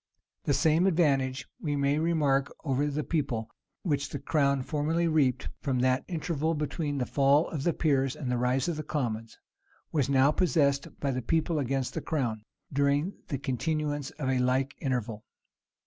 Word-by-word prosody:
The 145 Hz, -, +2 dB
same 165 Hz, +3 st, +3 dB
advantage, 135 Hz, -7 st, +2 dB
we 145 Hz, -3 st, -1 dB
may 140 Hz, +1 st, +2 dB
remark, 150 Hz, -5 st, +2 dB
over 140 Hz, -1 st, +1 dB
the 150 Hz, +1 st, -2 dB
people, 130 Hz, -9 st, -2 dB, 0.3 s
which 145 Hz, -5 st, 0 dB
the -, -, -4 dB
crown 140 Hz, -3 st, +1 dB
formerly 160 Hz, +4 st, 0 dB
reaped 140 Hz, -6 st, +2 dB
from 135 Hz, -3 st, -1 dB
that 130 Hz, 0 st, +2 dB
interval 160 Hz, -2 st, -1 dB
between 150 Hz, -1 st, -2 dB
the 125 Hz, -, 0 dB
fall 140 Hz, +4 st, +3 dB
of 155 Hz, -, -4 dB
the 170 Hz, -, +2 dB
peers 135 Hz, -5 st, +1 dB
and 125 Hz, -3 st, -2 dB
rise 125 Hz, +3 st, +1 dB
of 170 Hz, -3 st, -1 dB
the 155 Hz, -, -3 dB
commons, 115 Hz, -8 st, -3 dB, 0.5 s
was 145 Hz, -4 st, +1 dB
now 135 Hz, +1 st, +5 dB
possessed 150 Hz, -5 st, +2 dB
by 140 Hz, -, 0 dB
the 130 Hz, 0 st, -2 dB
people 160 Hz, +4 st, 0 dB
against 135 Hz, -1 st, -1 dB
the -, -, -3 dB
crown, 120 Hz, -9 st, -1 dB, 0.3 s
during 140 Hz, +6 st, +2 dB
the 140 Hz, -, -2 dB
continuance 145 Hz, +1 st, -2 dB
of 145 Hz, -4 st, -3 dB
a 130 Hz, -1 st, +2 dB
like 130 Hz, +2 st, +1 dB
interval. 120 Hz, -5 st, -2 dB
140 Hz, 165 wpm, -29 LUFS, 130-155 Hz, 0.5 s, now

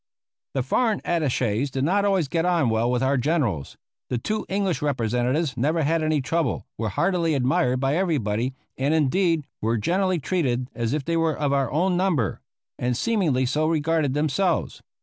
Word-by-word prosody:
The 135 Hz, -, +1 dB
foreign 220 Hz, -, +1 dB
attaches 135 Hz, -6 st, 0 dB
did 130 Hz, 0 st, -2 dB
not 200 Hz, +6 st, +2 dB
always 190 Hz, -6 st, +2 dB
get 165 Hz, +3 st, 0 dB
on 170 Hz, -7 st, +2 dB
well 110 Hz, +2 st, +1 dB
with 125 Hz, +1 st, 0 dB
our 135 Hz, +1 st, +2 dB
generals. 125 Hz, -, -1 dB, 0.3 s
The 125 Hz, -, 0 dB
two 215 Hz, -, -3 dB
English 195 Hz, -4 st, 0 dB
representatives 130 Hz, +2 st, 0 dB
never 155 Hz, +6 st, +1 dB
had 160 Hz, +3 st, +1 dB
any 155 Hz, -2 st, +1 dB
trouble, 160 Hz, -2 st, -1 dB
were 110 Hz, 0 st, -2 dB
heartily 165 Hz, -, +1 dB
admired 125 Hz, -1 st, +1 dB
by 135 Hz, +2 st, +1 dB
everybody, 130 Hz, -, 0 dB, 0.2 s
and, 140 Hz, +4 st, +2 dB
indeed, 160 Hz, +1 st, +2 dB, 0.2 s
were 115 Hz, +2 st, +1 dB
generally 185 Hz, -, +1 dB
treated 130 Hz, -6 st, -1 dB
as 115 Hz, 0 st, -2 dB
if 150 Hz, -2 st, -2 dB
they 165 Hz, 0 st, 0 dB
were 165 Hz, -1 st, +1 dB
of 145 Hz, -2 st, 0 dB
our 135 Hz, -3 st, +1 dB
own 180 Hz, +4 st, +1 dB
number; 175 Hz, -, 0 dB, 0.4 s
and 125 Hz, -1 st, 0 dB
seemingly 170 Hz, -, +1 dB
so 150 Hz, +5 st, 0 dB
regarded 155 Hz, -3 st, +1 dB
themselves. 155 Hz, +4 st, 0 dB
145 Hz, 170 wpm, -24 LUFS, 125-170 Hz, 0.4 s, not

